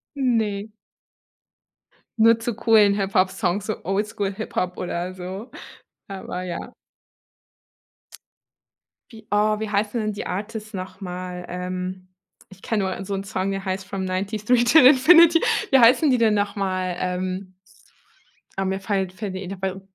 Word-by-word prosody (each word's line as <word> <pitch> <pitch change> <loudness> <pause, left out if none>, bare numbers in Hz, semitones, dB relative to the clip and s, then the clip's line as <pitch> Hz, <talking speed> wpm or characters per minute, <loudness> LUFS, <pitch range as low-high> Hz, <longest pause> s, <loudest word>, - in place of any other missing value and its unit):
Ne. 220 -6 0 1.5
Nur 230 +1 +5
zu 230 0 -3
coolen 215 -3 +4
Hip 195 -1 -2
Hop 185 0 +4
Songs, 200 0 -1
so 215 - -4
Oldschool 200 +1 -2
Hip 215 +3 -7
Hop 180 0 -1
oder 180 +1 -4
so. 185 +5 -7 0.6
Aber 190 -2 -6
ja. 175 -1 -6 2.4
Wie 220 -2 -14
oh, 210 +1 +2
wie 220 - -3
heißen 210 +3 0
denn 215 -1 -2
die 205 - -6
Artists 215 +3 -5
nochmal? 185 -1 -6
Ähm, 185 +1 -5 0.4
ich 195 0 -16
kenne 210 -4 -1
nur 195 - -7
so 200 - -4
'n 195 0 -3
Song, 195 0 -2
der 195 0 -4
heißt 190 0 -3
from 190 0 -4
93 200 +3 -3 0.2
to 310 +7 +7
Infinity. 325 +6 +7 0.3
Wie 270 - +6
heißen 250 +6 +6
die 255 - +3
denn 225 -2 +3
nochmal? 195 -3 -1
Ähm 185 +1 -3 1.0
ah, 195 - -1
mir 190 +1 -1
fallen 195 -3 -1
fällen 190 +1 -6
die 190 +1 -5
Interp 190 0 -5
195 Hz, 145 wpm, -23 LUFS, 185-220 Hz, 2.4 s, to